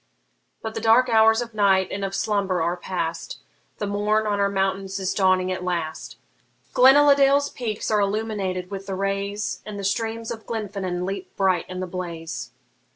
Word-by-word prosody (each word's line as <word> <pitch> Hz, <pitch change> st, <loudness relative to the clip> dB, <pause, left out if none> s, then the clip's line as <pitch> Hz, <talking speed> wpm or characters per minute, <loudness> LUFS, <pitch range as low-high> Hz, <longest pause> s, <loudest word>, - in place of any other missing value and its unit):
But 220 Hz, 0 st, -4 dB
the 225 Hz, -, -4 dB
dark 230 Hz, +3 st, +5 dB
hours 225 Hz, 0 st, +5 dB
of 235 Hz, -1 st, -6 dB
night 195 Hz, -3 st, +3 dB
and 200 Hz, -, -3 dB
of 195 Hz, 0 st, -3 dB
slumber 200 Hz, -4 st, 0 dB
are 170 Hz, +2 st, 0 dB
past, 170 Hz, -2 st, -4 dB, 0.4 s
The 210 Hz, -, -3 dB
morn 210 Hz, +2 st, +1 dB
on 205 Hz, -1 st, 0 dB
our 200 Hz, 0 st, +2 dB
mountains 195 Hz, 0 st, -1 dB
is 190 Hz, -1 st, -1 dB
dawning 185 Hz, -1 st, +2 dB
at 185 Hz, 0 st, -3 dB
last; 170 Hz, -3 st, -3 dB, 0.6 s
Glenaladale's 280 Hz, +1 st, +6 dB
peaks 220 Hz, -3 st, -3 dB
are 210 Hz, -, +3 dB
illumined 200 Hz, -3 st, -2 dB
with 195 Hz, -1 st, -6 dB
the 195 Hz, -, -3 dB
rays, 200 Hz, +2 st, -2 dB
And 210 Hz, -1 st, -7 dB
the 200 Hz, -, -5 dB
streams 225 Hz, +3 st, -2 dB
of 225 Hz, -1 st, -8 dB
Glenfinnan 195 Hz, -5 st, -3 dB
leap 195 Hz, 0 st, -6 dB
bright 190 Hz, -3 st, +1 dB
in 185 Hz, 0 st, -5 dB
the -, -, -2 dB
blaze. 165 Hz, -8 st, -6 dB
200 Hz, 170 wpm, -24 LUFS, 185-220 Hz, 0.6 s, Glenaladale's